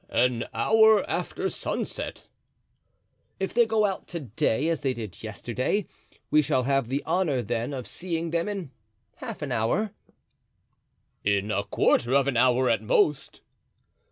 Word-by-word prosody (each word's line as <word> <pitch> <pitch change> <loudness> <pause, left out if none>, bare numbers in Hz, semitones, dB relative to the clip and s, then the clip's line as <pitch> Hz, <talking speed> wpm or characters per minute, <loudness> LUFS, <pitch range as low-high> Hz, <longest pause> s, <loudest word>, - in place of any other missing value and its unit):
"An 120 -1 +1
hour 220 -1 +4
after - - -2
sunset." - - -4 1.1
"If 190 - -2
they 235 -1 +4
go 220 -1 +2
out 195 -2 -3
to 170 - -5
day 120 +3 0
as 165 -3 0
they 130 -2 -1
did 110 -6 -7
yesterday 120 - -2 0.5
we 155 - +6
shall 130 -2 +1
have 135 -1 +1
the 135 +3 -2
honor, 155 -9 +1
then, 120 +3 -2
of 130 -3 -5
seeing 170 -2 -3
them 170 +4 0
in 190 -9 -5 0.5
half - - -6
an - - -4
hour?" 195 - 0 1.3
"In 100 +1 +1
a 100 - 0
quarter 120 +5 +2
of 140 -1 +3
an 140 - 0
hour 125 +1 +4
at 115 - +2
most." 135 +6 +1
135 Hz, 150 wpm, -26 LUFS, 120-175 Hz, 1.3 s, we